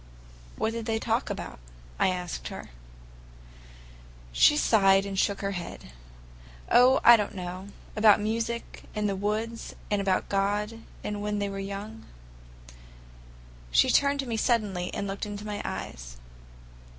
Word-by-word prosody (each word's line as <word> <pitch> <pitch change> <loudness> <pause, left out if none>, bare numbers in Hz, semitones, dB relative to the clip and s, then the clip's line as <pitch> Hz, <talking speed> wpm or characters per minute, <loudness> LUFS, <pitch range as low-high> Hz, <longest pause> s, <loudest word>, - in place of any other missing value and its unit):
"What 220 - -1
did 230 0 -5
they 225 -1 +1
talk - - -1
about?" - - -6 0.4
I - - +4
asked 180 -2 -3
her. - - -8 1.6
She 295 - +5
sighed 195 -6 +4
and 195 -1 -3
shook 200 -1 +1
her 195 0 -1
head. 175 - -7 0.8
"Oh, 250 +2 +6
I 240 - +10
don't 210 -2 -2
know! 185 +1 -6 0.3
About 215 -1 +6
music, 230 +2 -3
and 210 0 0
the 200 - -1
woods, 215 +4 -3 0.2
and 205 -1 +2
about 190 -1 +1
God, 205 +3 -1 0.2
and 210 -1 -3
when 210 0 -1
they 200 -1 -1
were 195 0 -5
young." 200 +3 -6 1.7
She - - +4
turned 280 0 +3
to - - -6
me 230 -3 -2
suddenly 210 -7 0
and 200 - -3
looked 200 +1 -4
into 205 0 -6
my 210 -1 -4
eyes. - - -6
205 Hz, 145 wpm, -27 LUFS, 195-225 Hz, 1.7 s, I